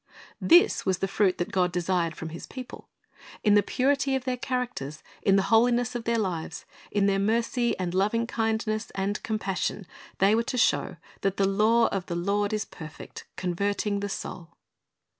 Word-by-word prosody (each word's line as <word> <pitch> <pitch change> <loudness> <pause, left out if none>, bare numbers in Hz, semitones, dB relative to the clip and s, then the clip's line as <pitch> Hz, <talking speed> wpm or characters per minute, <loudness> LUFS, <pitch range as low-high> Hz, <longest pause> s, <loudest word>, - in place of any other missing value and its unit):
"' - - -28
This 350 - +5
was 190 -2 +1
the 195 - -1
fruit 195 -1 +2
that 175 - -3
God 180 -1 +2
desired 175 -1 0
from 160 - -6
His 165 +1 -8
people. 255 -2 -9 0.5
In 210 - +5
the 205 - +6
purity 275 +5 +1
of 265 - -2
their 255 -1 0
characters, 245 - -4 0.2
in 195 - +4
the 195 - +3
holiness 240 +2 +4
of 240 -2 -5
their 235 0 +1
lives, 175 -7 -3 0.2
in 205 -1 +1
their 195 -1 +2
mercy 230 +3 +1
and 180 -2 -3
loving 210 +5 +1
kindness 220 -1 -1
and 195 +2 -1
compassion, 200 -2 -2 0.3
they 195 +2 +4
were 225 - +3
to 245 +2 -3
show 245 - +2 0.2
that 195 0 0
"the 195 - +3
law 220 +4 +4
of 195 -2 -3
the 170 - -3
Lord 200 +4 0
is 215 -1 -1
perfect, 155 -3 -10
converting 200 +3 -1
the 205 0 -3
soul." 170 -3 -7
205 Hz, 180 wpm, -27 LUFS, 185-230 Hz, 0.5 s, the